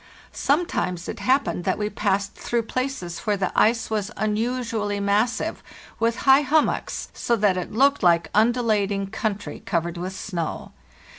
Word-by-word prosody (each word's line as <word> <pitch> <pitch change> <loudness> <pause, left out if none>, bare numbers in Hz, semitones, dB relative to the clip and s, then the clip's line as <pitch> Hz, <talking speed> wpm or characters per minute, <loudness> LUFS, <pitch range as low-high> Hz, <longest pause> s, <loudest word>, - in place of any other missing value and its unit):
Sometimes 270 - 0
it - - -5
happened 260 -8 +1
that 190 - 0
we 210 - -1
passed 200 -1 -1
through 235 -1 -2
places 255 -8 -3
where 210 -2 0
the 190 -1 -1
ice 225 0 +2
was 210 -1 -1
" - - -23
unusually 220 -1 -1
massive, 205 +4 0 0.4
with 230 +1 +2
high 270 +1 +7
hummocks, 295 +2 0
so 235 - 0
that 205 -4 +2
it 180 - -4
looked 275 +5 +3
lke 170 -2 +4
undulating 215 -3 +2
country 205 0 -4
covered 170 -1 -2
with 185 +2 -4
snow." 175 -4 -4
210 Hz, 150 wpm, -24 LUFS, 195-240 Hz, 0.4 s, high